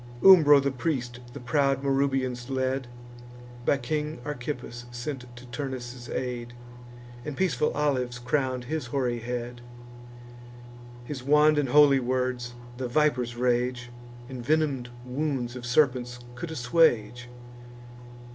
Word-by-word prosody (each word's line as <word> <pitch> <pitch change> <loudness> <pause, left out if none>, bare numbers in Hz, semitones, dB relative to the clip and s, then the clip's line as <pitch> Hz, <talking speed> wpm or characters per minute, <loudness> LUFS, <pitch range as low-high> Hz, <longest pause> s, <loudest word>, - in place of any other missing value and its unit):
Umbro 155 -7 +9
the 140 - +1
priest 125 -2 -2
the - - -7
proud 135 +2 +1
Marrubians 135 -2 0
led, 130 -1 -1 0.8
By 140 - +4
King 150 +4 -3
Archippus 125 -4 -5
sent 125 +2 -5
to 120 +1 -11
Turnus' 120 -1 -6
aid, 120 -2 -4 0.7
And 145 +1 -6
peaceful 150 -7 +1
olives 130 -5 0
crown'd 130 0 -1
his 150 0 -3
hoary 125 -2 -1
head. 120 +1 -5 1.4
His 135 -1 -5
wand 150 +3 +4
and 140 -3 0
holy 145 0 +6
words, 125 -1 -2 0.2
the 130 -1 -3
viper's 125 -3 +1
rage, 125 0 0 0.4
And 130 -2 -7
venom'd 140 -3 +1 0.2
wounds 130 -2 -2
of 120 -1 -6
serpents 125 -2 +2 0.2
could 165 +7 -6
assuage. 125 -4 +2
130 Hz, 120 wpm, -27 LUFS, 120-145 Hz, 1.4 s, Umbro